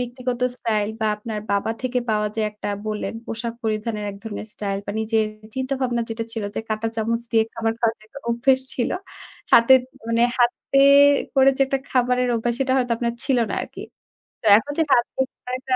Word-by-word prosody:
ব্যক্তিগত 250 0 -4 0.2
স্টাইল 215 -4 0
বা 220 - +1
আপনার 210 0 -5
বাবা 200 +2 0
থেকে 255 -1 0
পাওয়া 210 0 +1
যে - - 0
একটা 210 0 -6 0.2
বললেন 215 +1 -3
পোশাক 230 +1 -4
পরিধানের 215 -1 -2
এক 200 - -10
ধরনের 215 -1 -6
স্টাইল 200 -1 -3
বা - - -2
নিজের 220 0 +1 0.3
চিন্তা 260 +1 -2
ভাবনা 240 -2 0
যেটা 225 0 -3
ছিল 225 -2 -3
যে - - 0
কাঁটা 215 +1 -1
চামচ 230 +1 -1
দিয়ে 225 -1 +4
খাবার 225 0 0
খাওয়ার 225 -1 +2
যে - - -18
একটা 280 - -11
অভ্যেস 260 +3 +3
ছিল। 240 - -1 0.6
হাতে 235 +3 +7 0.4
মানে 230 0 +2 0.2
হাতে 245 +3 +2 0.6
করে 270 0 +6
যে 275 - +5
একটা 270 0 0
খাবারের 250 0 +2
অভ্যাস 235 +1 -1
সেটা 260 -1 +1
হয়তো 245 -2 +1
আপনার 235 -1 -1
ছিল 265 -3 +2
না - - -1
আরকি। - - -10 0.6
তো 225 - -2
এখন 285 +6 -3
যে - - +5
হাত 240 -1 +4
দিয়ে 265 0 +1 0.3
একটা 260 0 -1
230 Hz, 195 wpm, -22 LUFS, 220-255 Hz, 0.6 s, হাতে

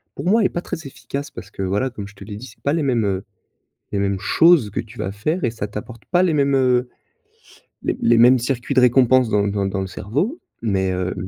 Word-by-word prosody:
pour - - -6
moi 215 +5 +4
est - - +3
pas 175 - -4
très 165 -2 -6
efficace 140 +2 -6
parce - - -10
que, - - -7
voilà, 100 +8 0
comme 105 -5 -8
je 105 - -18
te 100 - -11
l'ai 105 0 -7
dit, 125 +5 -9
c'est 120 - -17
pas 140 - +1
les 165 -1 0
mêmes, 120 -5 +1
heu, 95 -1 -1 0.7
les 100 - 0
mêmes 100 -1 -1
choses 160 - +4
que - - -2
tu 110 +1 -13
vas 95 - -2
faire 155 - -2
et 120 - +2
ça 115 -3 -4
t'apporte 110 +3 -8
pas 175 0 +4
les 170 -4 +1
mêmes, 140 -1 +2
heu, 125 -1 +2 0.9
les - - -1
les 120 0 +4
mêmes 125 +2 +7
circuits 125 +2 -2
de 130 - +5
récompense 125 -1 +4
dans 105 -1 +2
dans 100 -1 -1
dans 95 0 -2
le - - -3
cerveau 145 - -2 0.2
mais 95 -4 0
heu 90 0 -2
120 Hz, 245 wpm, -21 LUFS, 100-140 Hz, 0.9 s, mêmes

